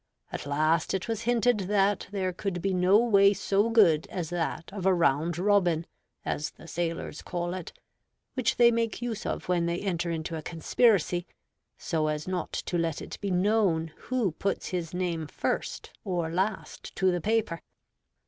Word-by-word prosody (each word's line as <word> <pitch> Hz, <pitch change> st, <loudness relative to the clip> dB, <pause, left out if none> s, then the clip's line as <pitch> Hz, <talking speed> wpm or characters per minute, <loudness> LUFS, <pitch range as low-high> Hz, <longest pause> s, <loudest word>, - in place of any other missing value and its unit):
At -, -, -5 dB
last 155 Hz, +4 st, +1 dB
it 190 Hz, -, -3 dB
was 225 Hz, -2 st, -2 dB
hinted 245 Hz, -1 st, +3 dB
that 205 Hz, 0 st, +2 dB
there 190 Hz, -2 st, -2 dB
could 185 Hz, -1 st, -3 dB
be 195 Hz, +2 st, 0 dB
no 180 Hz, +2 st, +5 dB
way 200 Hz, -4 st, +5 dB
so 200 Hz, +2 st, +1 dB
good 180 Hz, -9 st, +4 dB
as 175 Hz, -4 st, -4 dB
that 170 Hz, +1 st, -3 dB
of 190 Hz, -2 st, -2 dB
a 190 Hz, -, +5 dB
'Round 165 Hz, 0 st, +2 dB
Robin,' 180 Hz, -4 st, +2 dB, 0.4 s
as 150 Hz, -, -2 dB
the -, -, -15 dB
sailors 170 Hz, 0 st, -3 dB
call 175 Hz, -1 st, -3 dB
it, 185 Hz, -3 st, -6 dB, 0.6 s
which 255 Hz, -4 st, +1 dB
they 235 Hz, -1 st, +7 dB
make 230 Hz, 0 st, -1 dB
use 230 Hz, -3 st, -3 dB
of -, -, -3 dB
when 175 Hz, -2 st, +1 dB
they 170 Hz, +1 st, -1 dB
enter 175 Hz, -3 st, -1 dB
into 165 Hz, 0 st, -3 dB
a 160 Hz, -, -4 dB
conspiracy, 175 Hz, +2 st, +2 dB, 0.5 s
so 160 Hz, -6 st, -1 dB
as 150 Hz, +1 st, -2 dB
not 185 Hz, -2 st, -2 dB
to 175 Hz, -, -2 dB
let 165 Hz, -2 st, -1 dB
it -, -, -8 dB
be 200 Hz, -, -2 dB
known 180 Hz, -4 st, +2 dB
who 245 Hz, -7 st, -1 dB
puts 195 Hz, +5 st, -2 dB
his 175 Hz, -3 st, -3 dB
name 175 Hz, -3 st, -2 dB
first -, -, -3 dB
or 175 Hz, -5 st, -2 dB
last 190 Hz, +5 st, -3 dB
to 190 Hz, -1 st, +3 dB
the 175 Hz, -1 st, -1 dB
paper. 215 Hz, -5 st, 0 dB
180 Hz, 175 wpm, -28 LUFS, 165-205 Hz, 0.6 s, they